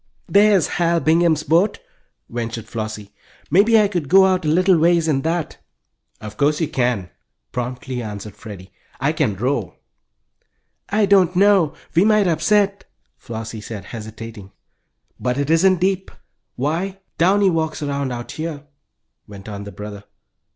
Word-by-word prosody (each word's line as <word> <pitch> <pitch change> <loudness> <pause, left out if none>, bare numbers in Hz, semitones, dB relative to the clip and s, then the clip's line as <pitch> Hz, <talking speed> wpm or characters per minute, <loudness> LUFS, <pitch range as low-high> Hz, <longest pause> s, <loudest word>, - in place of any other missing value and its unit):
"There's 200 -4 +4
Hal 170 0 +1
Bingham's 160 -1 +2
boat," 175 +7 +2 0.5
ventured 115 -1 -5
Flossie. 110 -2 -6 0.4
"Maybe 215 +7 +5
I 210 - +4
could 175 -8 -3
go 190 +1 +7
out 185 -3 +1
a - - 0
little 180 +3 +4
ways 170 0 +3
in 140 -4 +1
that." 165 +1 -2 0.6
"Of 105 0 -9
course 150 +2 +2
you 160 - 0
can," 120 - -1 0.4
promptly 125 0 -4
answered 105 -2 -7
Freddie. 100 -4 -11 0.3
"I 135 +3 +1
can 140 -10 0
row." 120 - -2 1.1
"I 210 +1 +2
don't 190 -3 +4
know, 195 -5 +4 0.2
we 170 +4 +4
might 215 -1 +4
upset!" 200 +3 +1 0.3
Flossie 115 -1 -7
said, 105 -2 -8
hesitating. 110 -2 -9 0.7
"But 125 0 -1
it 140 +2 -1
isn't 185 +2 +4
deep. 190 +1 0 0.5
Why, 165 +9 -2 0.2
Downy 190 +3 +4
walks 160 -2 -2
around 140 -2 -2
out 120 -1 -6
here," 155 -2 -5 0.6
went 100 -1 -11
on 100 -1 -7
the 100 - -8
brother. 105 -1 -9
155 Hz, 145 wpm, -20 LUFS, 115-185 Hz, 1.1 s, go